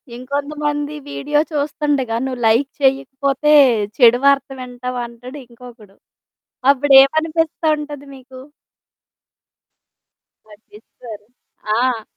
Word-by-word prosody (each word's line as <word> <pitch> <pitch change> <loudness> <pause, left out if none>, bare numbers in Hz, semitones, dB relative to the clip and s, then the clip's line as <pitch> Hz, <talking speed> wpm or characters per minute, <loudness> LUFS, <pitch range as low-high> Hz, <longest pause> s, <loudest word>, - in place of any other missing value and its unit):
ఇంకొంతమంది 290 +3 -4 0.2
వీడియో 295 +1 -1
చూస్తుండగా, 285 -4 -2
నువ్వు 255 -2 -5
లైక్ 235 +5 +2
చేయకపోతే 275 +2 0 0.5
చెడు 245 -2 +5
వార్త 280 0 +3
వింటావు 250 0 -6
అంటాడు 240 +4 -11
ఇంకొకడు. 235 -4 -16 0.8
అప్పుడేమనిపిస్తా 310 +4 +3
ఉంటది 290 -1 -9
మీకు? 260 -1 -14 2.1
పట్టిచ్చుకోరు. 210 0 -14 0.5
ఆ! 245 -3 0
270 Hz, 80 wpm, -18 LUFS, 245-290 Hz, 2.1 s, చెడు